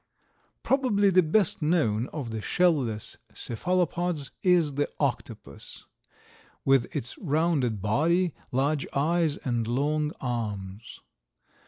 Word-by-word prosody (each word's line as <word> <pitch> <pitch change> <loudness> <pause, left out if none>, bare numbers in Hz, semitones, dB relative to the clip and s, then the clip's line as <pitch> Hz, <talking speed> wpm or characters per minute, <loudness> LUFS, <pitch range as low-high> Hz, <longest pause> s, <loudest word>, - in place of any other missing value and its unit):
Probably 220 -7 +3
the 185 0 +6
best 175 +3 +1
known 140 -8 +1
of 135 -7 -6
the 110 -1 -4
shell 180 +7 +3
less 115 -7 -4 0.2
cephalopods 175 +2 -1
is 175 -5 +3
the 145 +1 0
octopus, - - -4 0.8
with 135 -3 +4
its 120 - -3
rounded 145 - 0
body, 165 - +2 0.2
large 140 +3 0
eyes 155 +1 +1
and 120 -3 -2
long 150 +5 0
arms. 105 -4 -5
145 Hz, 110 wpm, -27 LUFS, 120-175 Hz, 0.8 s, the